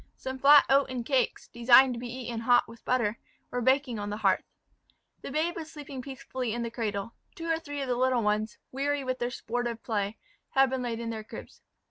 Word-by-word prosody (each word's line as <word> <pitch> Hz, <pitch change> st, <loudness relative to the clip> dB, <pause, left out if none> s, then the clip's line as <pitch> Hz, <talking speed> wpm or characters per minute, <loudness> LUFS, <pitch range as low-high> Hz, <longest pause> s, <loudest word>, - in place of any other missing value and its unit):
Some 260 Hz, 0 st, -6 dB
flat 285 Hz, +2 st, +8 dB
oaten 265 Hz, -3 st, +2 dB
cakes, 255 Hz, -1 st, 0 dB
designed 245 Hz, +2 st, +6 dB
to 235 Hz, -, -5 dB
be 245 Hz, 0 st, -6 dB
eaten 240 Hz, -2 st, -5 dB
hot 245 Hz, +1 st, +4 dB
with 230 Hz, 0 st, -14 dB
butter, 235 Hz, -3 st, 0 dB, 0.3 s
were 245 Hz, -, -1 dB
baking 260 Hz, -2 st, +2 dB
on 205 Hz, 0 st, -4 dB
the 210 Hz, -, -3 dB
hearth. 195 Hz, -3 st, +1 dB, 0.7 s
The -, -, -6 dB
babe 315 Hz, +5 st, 0 dB
was 320 Hz, -1 st, -7 dB
sleeping 285 Hz, -3 st, -7 dB
peacefully 260 Hz, -3 st, -4 dB
in 240 Hz, -, -2 dB
the 235 Hz, -, -4 dB
cradle; 215 Hz, -2 st, -3 dB, 0.2 s
two 330 Hz, -, -7 dB
or 325 Hz, -1 st, +1 dB
three 290 Hz, -3 st, -6 dB
of 270 Hz, -, -3 dB
the 250 Hz, -, +1 dB
other 245 Hz, -, -2 dB
little 255 Hz, -2 st, +2 dB
ones, 210 Hz, +1 st, 0 dB
weary 280 Hz, +1 st, -1 dB
with 255 Hz, 0 st, -2 dB
their 240 Hz, -, -1 dB
sportive 240 Hz, -1 st, -3 dB
play, 210 Hz, -2 st, -2 dB, 0.4 s
had 270 Hz, -1 st, +5 dB
been 260 Hz, -1 st, -1 dB
laid 235 Hz, -2 st, -3 dB
in 230 Hz, -1 st, -3 dB
their 220 Hz, -1 st, -5 dB
cribs. -, -, -11 dB
245 Hz, 215 wpm, -29 LUFS, 230-270 Hz, 0.7 s, flat